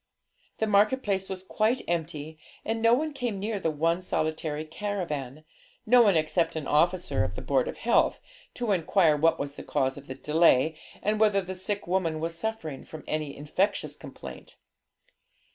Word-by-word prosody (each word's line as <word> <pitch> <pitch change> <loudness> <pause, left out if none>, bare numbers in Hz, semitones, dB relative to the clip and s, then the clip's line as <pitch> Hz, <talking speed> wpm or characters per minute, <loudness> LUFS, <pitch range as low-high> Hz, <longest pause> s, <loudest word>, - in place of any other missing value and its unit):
The 220 - +1
market 215 +5 +3
place 195 -2 -1
was 190 -1 -5
quite 220 +6 0
empty, 160 -2 -3 0.3
and 225 0 -1
no 230 +1 +6
one 305 +3 -2
came 245 -7 -3
near 210 +1 -2
the 165 - 0
one 165 +3 +1
solitary 155 -3 -2
caravan 155 -6 -4 0.4
no 245 +2 +7
one 200 -7 +5
except 165 +2 +1
an 155 -2 -3
officer 170 - +2
of 90 +1 -3
the - - -5
Board 135 -3 +1
of - - -5
Health, 235 0 +2 0.4
to 240 -3 -1
inquire 170 -3 +3
what 165 +2 +3
was 140 -1 -4
the - - -9
cause 135 -2 0
of 140 0 -11
the 130 - -6
delay, 155 0 +3 0.3
and 210 +1 +1
whether 210 -2 +4
the 185 +1 -5
sick 200 +2 -3
woman 175 -3 0
was 165 +1 -3
suffering 165 -7 -4
from 155 -1 -10
any 155 -2 -3
infectious 185 +8 -1
complaint. - - -10
170 Hz, 175 wpm, -28 LUFS, 155-205 Hz, 0.4 s, no